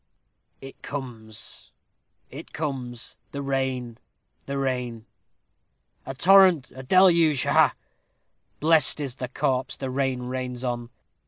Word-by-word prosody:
"It 135 0 -12
comes, 115 -6 -7 0.6
it - - -10
comes 130 -6 -5 0.2
the 140 0 -4
rain 130 -3 -2 0.5
the 140 0 -3
rain 125 -4 -3 1.0
a 135 - -5
torrent 185 -3 +5
a 130 - -9
deluge 170 -1 +4
ha, - - 0
ha! - - +4 0.8
Blessed 155 -2 +4
is 135 -4 -4
the 125 - -4
corpse 130 0 -1
the 135 -2 -4
rain 130 -1 -1
rains 125 0 -4
on. 120 -2 -3
130 Hz, 115 wpm, -25 LUFS, 125-140 Hz, 1.0 s, torrent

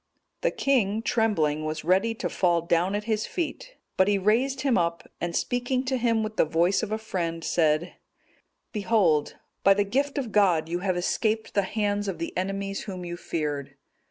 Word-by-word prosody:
The - - +2
king, 225 -6 +1
trembling, 160 -12 +1
was 155 0 -3
ready 190 +7 +2
to - - -3
fall 170 -3 +1
down 175 +3 +1
at 210 - -2
his 215 -1 -1
feet, 440 +9 -4 0.2
but 190 - +4
he 205 -1 +3
raised 230 +8 +1
him 270 -4 +2
up, 170 -1 0
and 175 -1 -2
speaking 245 +1 0
to 260 0 0
him 230 -2 +1
with 215 0 -5
the - - +5
voice 170 +5 +2
of 220 -2 -4
a 215 - 0
friend, 170 -6 -3
said, 160 +1 +1 0.8
"Behold, 195 -8 +2 0.3
by 195 0 +6
the 205 - +2
gift 275 +8 -1
of 255 -6 -2
God 185 -7 +3
you 175 +2 -2
have 185 -1 -1
escaped 220 +5 -1
the 200 - +3
hands 205 0 -1
of 190 -4 -3
the 165 +1 -5
enemies 195 +1 -3
whom 185 -3 -6
you 175 0 -4
feared. 150 -5 -4
195 Hz, 185 wpm, -26 LUFS, 170-225 Hz, 0.8 s, by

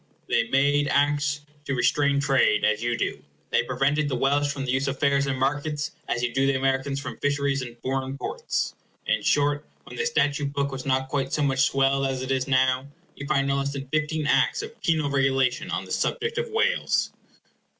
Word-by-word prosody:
They 115 - +2
made 145 +2 +3
Acts 145 +1 +1 0.2
to 135 - -1
restrain 140 +3 +2
trade, 135 -6 +3
as 110 0 +1
you 120 0 0
do; - - -1
and - - -25 0.3
they - - +3
prevented 145 +3 0
the 130 - -1
Welsh 140 +3 +1
from 140 -1 -4
the 125 - -1
use 130 +2 0
of 135 0 -2
fairs 140 0 +2
and 135 -1 -1
markets, 145 +3 -1 0.2
as 120 - -1
you 120 -1 -1
do 135 +1 +2
the 140 - +2
Americans 135 +1 0
from 140 - -7
fisheries 140 -1 0
and 120 -2 -8
foreign 135 +1 -2
ports. - - -3 0.3
In - - +1
short, 145 0 +2 0.2
when - - -11
the 460 - 0
Statute 145 - +1
Book 140 -1 -1
was 135 0 -6
not 130 0 +1
quite 135 -1 -2
so 150 - +1
much 135 -2 +1
swelled 135 0 +2
as 130 -1 -3
it 130 - -3
is 130 0 0
now, 130 0 +2 0.3
you 145 - -7
find 140 -2 +1
no 140 0 +1
less 140 0 -1
than 135 -1 -6
fifteen 155 +1 -1
acts 275 - +2
of 450 +1 -10
penal 160 -3 +1
regulation 135 -2 +1
on - - -2
the - - -11
subject 460 +1 -1
of 475 0 -3
Wales. 455 +3 +1
140 Hz, 210 wpm, -25 LUFS, 135-145 Hz, 0.3 s, made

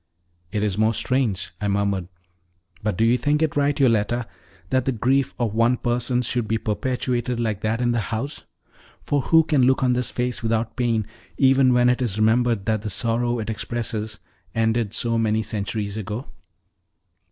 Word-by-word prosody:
"It 105 0 -1
is 105 -1 -1
most 110 0 +3
strange!" 125 -9 0
I 105 - 0
murmured. 100 -2 0 0.7
"But 105 -3 -1
do 115 - +3
you 120 +2 +3
think 150 +2 +1
it 155 - 0
right, 145 +1 +1
Yoletta, 120 -2 +2 0.5
that 130 -1 +2
the 135 - +1
grief 130 +3 +1
of 115 -4 -1
one 115 +3 +3
person 120 +1 0
should 120 -2 -1
be 110 - +1
perpetuated 120 +3 -1
like 110 -4 -1
that 110 +1 -1
in 120 -1 +2
the 120 - +1
house; 115 +7 -4 0.6
for 145 -1 0
who 160 +4 +5
can 150 -3 +2
look 130 +1 +3
on 125 -1 +3
this 125 -1 -1
face 125 0 -2
without 115 0 -1
pain, 115 -4 0 0.3
even 135 -1 +5
when 125 0 +4
it 125 +1 +2
is 110 -5 -1
remembered 110 -1 +2
that 110 -2 0
the 110 - -4
sorrow 115 +4 0
it 110 -1 -3
expresses 110 -1 -3 0.4
ended 115 -1 0
so 115 -1 0
many 110 0 +1
centuries 105 0 -3
ago?" 110 +5 -4
115 Hz, 175 wpm, -23 LUFS, 110-125 Hz, 0.7 s, who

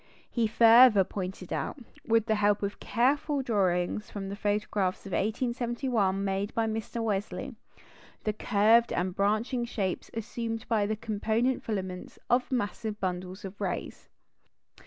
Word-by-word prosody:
He 235 -2 +1
further 230 -1 +7
pointed 185 -1 -5
out, - - -3 0.3
with 225 -1 +2
the 220 - +1
help 205 -1 +2
of 200 0 -3
careful 280 +3 +1
drawings 195 -3 0
from 195 -2 -5
the 200 - -4
photographs 205 -2 -1
of 195 - -7
1871 235 -2 0
made 195 +1 -1
by 230 - +2
Mr. 225 +1 -3
Wesley, 205 -2 -2 0.7
the 215 - 0
curved 220 +2 +3
and 180 +1 -1
branching 215 +5 +1
shapes 200 -6 -3
assumed 225 0 -4
by 215 -3 +1
the 215 - -1
component 220 +3 0
filaments 190 -4 -4
of 250 +2 +2
massive 215 -2 -2
bundles 185 +1 -4
of 195 +1 -9
rays. - - -4
215 Hz, 135 wpm, -29 LUFS, 195-235 Hz, 0.7 s, further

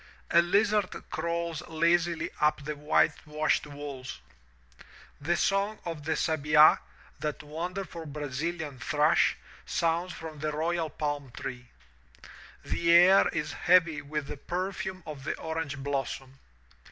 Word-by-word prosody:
A 170 - +7
lizard 200 +2 +2 0.2
crawls 170 0 -2
lazily 170 +1 +1
up 150 -1 +2
the 150 0 -3
whitewashed 150 +1 +1
wall. 145 -2 -7 1.2
The 170 +4 +1
song 200 +2 +1
of 165 -4 -5
the 160 0 0
sabidy 155 -1 +5 0.4
that 150 0 -3
wonderful 170 +2 -5
Brazilian 150 0 -4
thrush, 150 +7 +3 0.3
sounds 165 - 0
from 160 -3 -8
the 155 +1 -1
royal 165 +1 -1
palm 145 -2 -3
tree. 125 -2 -6 1.0
The 170 0 +1
air 180 +3 +7
is 150 - -3
heavy 170 -3 +3
with 150 0 -4
the 145 - -7
perfume 185 +3 -4
of 145 -3 -8
the - - -3
orange 160 -3 -4
blossom. 135 -1 -4
155 Hz, 120 wpm, -29 LUFS, 145-170 Hz, 1.2 s, A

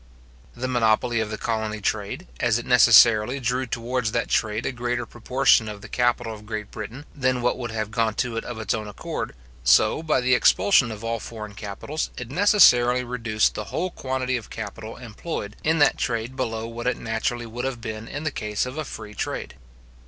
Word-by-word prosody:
The 125 +1 -3
monopoly 120 -1 +2
of 110 -1 -1
the 110 - -4
colony 110 -1 -2
trade, 110 - -2
as 115 - +2
it 120 - -5
necessarily 115 0 +6
drew 125 +1 -1
towards 120 -1 -2
that 115 - 0
trade 110 +1 0
a - - 0
greater 120 -1 -2
proportion 125 -1 +2
of 105 -1 -8
the - - -8
capital 120 -2 0
of 105 -1 -12
Great 105 -1 -5
Britain 115 +7 -7
than 130 -3 0
what 125 - +2
would 120 -1 -4
have 110 -1 -3
gone 115 -2 0
to 120 -1 -1
it 115 - -2
of 120 - -6
its 110 - -1
own 110 -1 -3
accord, 105 - -5 0.3
so, - - +4
by 160 -2 +1
the 125 +1 +2
expulsion 125 +1 +4
of 110 0 -8
all 115 0 -2
foreign 105 -2 -8
capitals, 105 +10 -4
it 125 0 -6
necessarily 125 -10 +5
reduced 115 -3 0
the 105 - -5
whole 185 - -2
quantity 130 -2 -2
of 115 - -9
capital 110 +1 -7
employed 110 -2 -6
in 160 +1 +2
that 145 - +4
trade 120 0 -2
below 115 -3 -2
what 115 +1 -5
it 125 - +1
naturally 115 +2 -2
would 120 +2 -6
have 135 -3 -3
been 110 -1 -6
in 145 +1 -5
the 155 - -1
case 105 -4 -2
of 130 +5 -6
a 155 - -3
free 110 -4 -8
trade. - - -4
115 Hz, 200 wpm, -24 LUFS, 110-125 Hz, 0.3 s, necessarily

